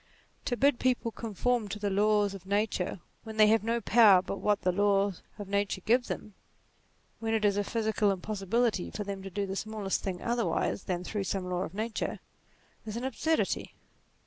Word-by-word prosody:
To 245 - -1
bid 280 -1 +3
people 250 -2 +1
conform 230 +1 -1
to 205 - -5
the 205 -1 -2
laws 205 0 +3
of 190 -1 -10
nature 200 -3 -1 0.2
when 220 -1 -8
they 215 - +8
have 220 -1 +3
no 230 +1 0
power 210 -6 +6
but 195 - -4
what 210 -1 +1
the 180 - +3
laws 200 0 +2 0.2
of 205 -2 -7
nature 200 -1 -1
give 245 +5 +2
them 210 - -5 0.9
when 225 0 0
it 215 -1 +1
is 200 -1 +3
a 205 - +1
physical 220 -1 +1
im 195 -2 0
possibility 210 +1 0
for 210 - -4
them 200 -1 -5
to 195 - -7
do 200 +2 -2
the 195 0 -4
smallest 210 -2 -2
thing 185 -2 -3
otherwise 235 -4 -1
than 180 -1 -2
through 200 +1 -3
some 190 -1 -2
law 180 0 -1
of 185 - -5
nature, 220 +1 -3 0.6
is 220 0 -5
an 240 - -4
absurdity. 300 +5 -1
210 Hz, 195 wpm, -30 LUFS, 195-225 Hz, 0.9 s, they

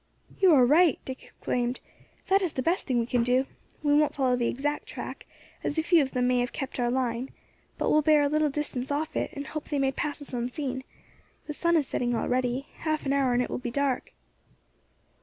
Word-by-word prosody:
"You 380 -2 +6
are 255 -3 +6
right," 310 +2 +5
Dick 260 0 -6
exclaimed, 245 0 -3 0.5
"that 390 0 +3
is 360 -5 -1
the 260 - -2
best 345 +6 0
thing 255 - +1
we 235 - +2
can 245 0 +1
do. 250 +3 +2 0.4
We 290 -1 +3
won't 300 0 +3
follow 260 -3 +2
the 240 -1 0
exact 290 - -2
track, - - -7 0.4
as 295 - -2
a 320 - +2
few 335 0 +5
of 265 -2 -2
them 250 -1 +1
may 250 0 +3
have 245 0 -1
kept 270 -2 -5
our 240 -1 +2
line, 250 0 -1 0.5
but - - 0
will 305 - +5
bear 300 -1 +5
a - - +3
little 305 +1 +2
distance 275 -3 -3
off 295 +2 -2
it, - - 0
and 280 0 -5
hope 310 0 -5
they 290 - 0
may 270 -1 +2
pass 295 +2 -3
us 285 -2 -10
unseen; 255 +2 -3 0.6
the 300 - -5
sun 340 +2 +2
is 300 - +1
setting 240 -1 -1
already, 250 +2 0
half 310 -2 -2
an 275 - +1
hour 270 -3 +2
and 245 +1 +2
it - - -5
will - - -2
be 245 - -4
dark." 275 +1 -1
275 Hz, 225 wpm, -27 LUFS, 250-300 Hz, 0.6 s, You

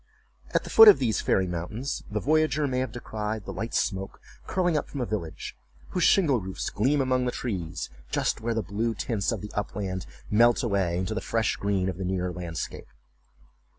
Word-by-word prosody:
At - - +1
the - - -8
foot 225 - +10
of 210 - +10
these 120 -5 0
fairy 95 - +2
mountains, 90 +10 -4
the 105 - -1
voyager 155 +3 +2
may 130 -2 0
have 130 -3 -2
descried 110 -3 -4
the 95 - -5
light 110 +6 -4
smoke 95 -1 -1 0.3
curling 175 -3 +1
up 150 - -1
from 140 - -6
a 125 - 0
village, 95 -8 -5 0.3
whose 180 - 0
shingle 145 - +4
roofs 95 0 -4
gleam 135 +7 +2
among 130 -1 +1
the 125 - 0
trees, 95 - -4 0.2
just - - 0
where 115 0 -1
the 110 - 0
blue 110 +3 -1
tints 100 +1 -1
of - - -3
the 105 - -7
upland 100 -2 -3 0.2
melt 120 +4 +5
away 95 -6 +1
into 95 +4 -2
the 110 - -2
fresh 115 -1 0
green 100 -2 0
of 95 -2 -3
the - - -2
nearer 90 -1 -1
landscape. 85 -3 -5
110 Hz, 195 wpm, -27 LUFS, 95-125 Hz, 0.3 s, foot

